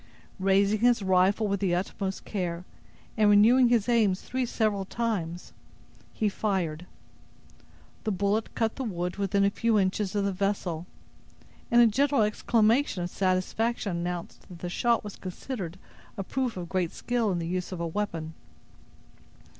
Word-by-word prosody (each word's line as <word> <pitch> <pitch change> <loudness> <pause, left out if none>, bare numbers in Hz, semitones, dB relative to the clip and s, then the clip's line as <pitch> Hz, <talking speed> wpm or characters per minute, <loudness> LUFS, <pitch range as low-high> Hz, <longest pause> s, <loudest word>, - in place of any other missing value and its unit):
Raising 195 +2 +3
his 240 -2 +3
rifle 190 +3 +3
with 200 -1 -1
the 185 -3 +1
utmost 190 +1 -3
care, 180 -3 -3 0.5
and 215 -2 +4
renewing 235 +5 +6
his 235 -3 +2
aim 225 -6 +3
three 250 +6 -3
several 215 -4 0
times, 190 -6 -3 0.6
he 215 - -1
fired. 180 -5 -2 1.2
The 215 - -1
bullet 200 +3 -1
cut 225 -1 0
the 270 - -2
wood 180 -5 -3
within 200 0 +1
a 200 - +2
few 230 +1 +1
inches 195 +1 0
of 200 -1 +1
the 200 - +1
vessel; 185 -3 -2 0.8
and 240 0 +6
a - - +7
general 270 +2 +3
exclamation 220 0 +2
of 175 - -4
satisfaction 190 +2 0
announced 175 0 -5
that 180 - -10
the 175 +1 -5
shot 235 +5 +1
was 205 -1 -7
considered 185 -1 -6 0.4
a 195 - -2
proof 250 +1 -2
of 175 -1 -5
great 180 -2 -1
skill 240 -4 -1
in 180 - -1
the 170 - -3
use 180 +2 -3
of 185 - -5
a 170 - -1
weapon. 165 -3 -3
200 Hz, 155 wpm, -27 LUFS, 180-220 Hz, 1.2 s, a